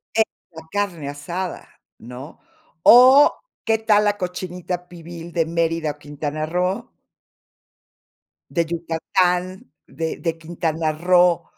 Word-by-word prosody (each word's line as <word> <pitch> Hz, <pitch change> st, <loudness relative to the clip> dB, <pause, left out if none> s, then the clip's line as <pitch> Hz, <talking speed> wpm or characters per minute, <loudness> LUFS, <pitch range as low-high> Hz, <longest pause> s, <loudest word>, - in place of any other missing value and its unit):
Es 220 Hz, -, +5 dB, 0.3 s
la 160 Hz, -1 st, -10 dB
carne 180 Hz, -8 st, -2 dB
asada, 170 Hz, +6 st, -5 dB, 0.3 s
¿no? 125 Hz, +5 st, -10 dB, 0.4 s
¿O 260 Hz, +4 st, +8 dB, 0.3 s
qué 225 Hz, 0 st, +2 dB
tal 210 Hz, -1 st, +3 dB
la 205 Hz, 0 st, +1 dB
cochinita 180 Hz, -1 st, -5 dB
pibil 170 Hz, -1 st, -10 dB
de 165 Hz, -1 st, +1 dB
Mérida 165 Hz, -1 st, -1 dB
o 145 Hz, -, -14 dB
Quintana 145 Hz, +1 st, -4 dB
Roo? 180 Hz, +4 st, -2 dB, 1.6 s
De 170 Hz, -, +1 dB
Yucatán, 175 Hz, +1 st, -1 dB
de 160 Hz, +4 st, -4 dB
de 165 Hz, -2 st, -2 dB
Quintana 160 Hz, -1 st, -2 dB
Roo, 175 Hz, +1 st, +3 dB
170 Hz, 115 wpm, -21 LUFS, 160-185 Hz, 1.6 s, O